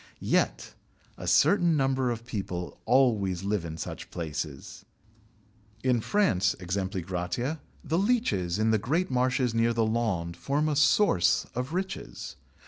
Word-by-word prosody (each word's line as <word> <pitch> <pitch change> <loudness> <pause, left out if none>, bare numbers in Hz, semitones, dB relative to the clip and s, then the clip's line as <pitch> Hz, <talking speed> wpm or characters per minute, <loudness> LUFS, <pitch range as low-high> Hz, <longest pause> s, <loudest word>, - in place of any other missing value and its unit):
Yet - - +1 0.4
a - - -8
certain 175 -5 +4
number 135 -2 +1
of 115 -1 -4
people 95 -6 -5
always 110 -8 +2
live 100 -2 -1
in 80 -1 -6
such - - -6
places. 75 -4 -6 1.0
In 125 -3 +2
France, 105 - +2
e.g., 95 0 -3 0.8
the 165 +1 0
leeches 195 - +1
in 110 +1 +2
the 110 - +3
great 155 - 0
marshes 125 -1 +1
near 115 +1 +2
the 115 -1 +1
Landes 100 -7 -1
form 145 - 0
a 150 - 0
source 140 - +3
of 125 +5 -4
riches. 190 +1 -5
115 Hz, 135 wpm, -28 LUFS, 95-135 Hz, 1.0 s, certain